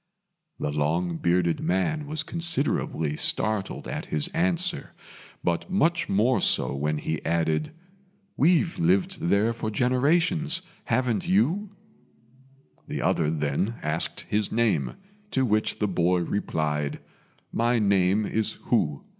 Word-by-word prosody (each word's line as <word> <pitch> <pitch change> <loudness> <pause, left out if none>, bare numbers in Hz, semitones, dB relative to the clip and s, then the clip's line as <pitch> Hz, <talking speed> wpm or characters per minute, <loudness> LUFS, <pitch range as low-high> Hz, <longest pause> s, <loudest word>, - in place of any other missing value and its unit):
The 75 - -1
long 80 +4 0
bearded 85 -1 +1
man 145 - 0
was 155 +1 -3
considerably 155 - -1
startled 110 -3 0
at - - -4
his 75 -1 0
answer, 175 0 -1 0.5
but 85 - -1
much 175 -3 +1
more 115 +6 +3
so 60 +2 +1
when 75 +2 -1
he 80 +1 -3
added, 80 -2 0 0.6
"We've 170 +3 +3
lived 90 +3 +1
there 100 +6 +2
for 115 -1 -3
generations: 155 - +1 0.2
haven't 120 -6 0
you?" 175 - +1 1.1
The - - -3
other 80 -3 +2
then 80 +8 -1
asked 75 +2 -2
his 105 0 -1
name, 105 - +1 0.3
to 130 -7 +1
which 110 -2 +1
the 105 - 0
boy 90 -1 +2
replied, 75 -5 -2 0.5
"My 120 +1 +2
name 100 -1 +3
is 110 0 -1
Hu. 75 - -1
105 Hz, 120 wpm, -26 LUFS, 80-140 Hz, 1.1 s, more